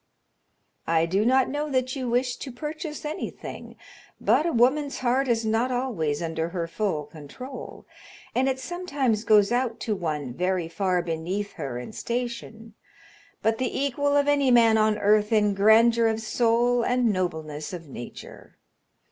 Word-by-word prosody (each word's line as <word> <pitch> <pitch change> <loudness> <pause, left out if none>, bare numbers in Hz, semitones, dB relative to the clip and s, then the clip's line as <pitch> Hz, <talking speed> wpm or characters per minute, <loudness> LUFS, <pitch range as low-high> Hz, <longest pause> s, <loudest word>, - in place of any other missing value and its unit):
"I 165 0 +3
do 190 +5 +1
not 260 +2 +3
know 295 +2 -3
that 255 -1 0
you 255 -3 -3
wish 250 +1 +1
to 270 - -7
purchase 300 +4 -6
anything, 300 - -6 0.4
but 320 - +3
a - - +1
woman's 275 +4 +2
heart 260 +2 +1
is 230 -2 +1
not 225 +4 +1
always 200 - -1
under 165 0 -2
her 170 -1 -3
full 170 -4 -2
control, 165 - -10 0.5
and 265 +2 +2
it 260 - -1
sometimes 280 - -1
goes 210 -1 +4
out 245 -1 0
to 220 - -1
one 150 -8 -3
very 180 +2 -1
far 180 +1 0
beneath 175 +5 -3
her 125 -3 -5
in 125 - -7
station, 235 -2 -5 0.7
but 225 +2 +1
the 255 0 -1
equal 285 +1 +1
of 285 0 +2
any 285 -2 +3
man 230 -2 +6
on 215 -1 +3
earth 210 +1 +3
in 210 -2 +3
grandeur 225 +3 +5
of 220 0 0
soul 235 +2 +2
and 245 -3 +2
nobleness 160 -5 -3
of 170 -3 -8
nature. 120 -3 -10
225 Hz, 155 wpm, -25 LUFS, 185-255 Hz, 0.7 s, man